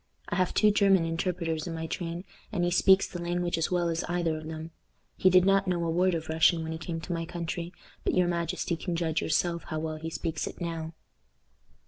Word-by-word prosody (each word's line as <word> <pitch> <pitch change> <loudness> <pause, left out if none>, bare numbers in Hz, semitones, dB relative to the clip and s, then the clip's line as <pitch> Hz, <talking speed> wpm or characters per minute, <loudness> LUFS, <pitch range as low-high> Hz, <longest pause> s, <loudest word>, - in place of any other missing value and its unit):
I - - -1
have 185 0 +1
two 210 -1 +5
German 195 -4 +4
interpreters 165 -1 -2
in 165 - -4
my 160 0 -4
train, 170 +1 -4 0.3
and 185 -5 0
he 175 - +1
speaks 190 +2 +5
the 175 - -7
language 175 0 -1
as 165 -1 0
well 175 -1 +1
as 165 -1 -1
either 175 -2 0
of 155 0 -7
them. 160 +1 -6 0.4
He 185 - +4
did 185 0 +6
not 195 0 +3
know 175 -2 0
a 165 - 0
word 180 +1 +2
of 160 -1 -4
Russian 160 +1 +3
when 160 - -4
he 160 - -4
came 165 0 -4
to 175 - -4
my 165 -1 -2
country, 170 0 -4 0.3
but - - 0
your 180 -1 +4
majesty 170 0 -1
can 170 +1 -3
judge 165 -1 0
yourself 170 +1 0
how 155 - -4
well 155 0 -3
he 160 +1 -5
speaks 160 0 -3
it - - -8
now." 165 -2 -4
170 Hz, 225 wpm, -29 LUFS, 160-180 Hz, 0.4 s, did